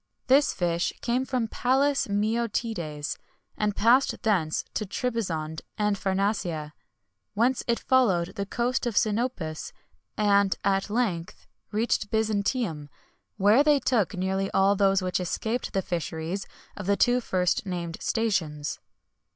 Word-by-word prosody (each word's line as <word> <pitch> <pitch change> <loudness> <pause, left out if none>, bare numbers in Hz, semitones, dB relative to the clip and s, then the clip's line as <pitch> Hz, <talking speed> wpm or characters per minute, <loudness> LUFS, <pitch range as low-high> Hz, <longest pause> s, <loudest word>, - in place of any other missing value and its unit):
This 275 +3 +4
fish 175 -1 0
came 250 +2 0
from 250 -4 -1
Palus 270 +5 +1
Meotides, 205 -7 -2 0.4
and 210 -1 -1
passed 245 +5 +3
thence 180 -9 +1
to - - -1
Trebizond 185 -8 -3 0.2
and 210 -1 +1
Pharnacia, 190 -6 -1 0.6
whence 245 +5 +2
it 235 -1 +2
followed 195 -10 +2
the 200 0 -4
coast 245 +3 -1
of 230 - -2
Sinopus, 210 -8 -1 0.5
and, 200 -2 +3
at 195 +1 +1
length, 205 -7 -2 0.3
reached 215 -1 0
Byzantium, 210 - -1 0.5
where 210 +7 +5
they 295 -1 +4
took 230 -6 +1
nearly 190 +1 -1
all 195 +1 +4
those 195 -1 +3
which 185 0 0
escaped 220 +7 -2
the 195 - -1
fisheries 170 +2 -3 0.3
of 205 -2 -7
the 200 0 +3
two 245 0 +3
first 185 -2 0
named 170 -2 -4
stations. 165 -10 -1
200 Hz, 125 wpm, -27 LUFS, 180-235 Hz, 0.6 s, where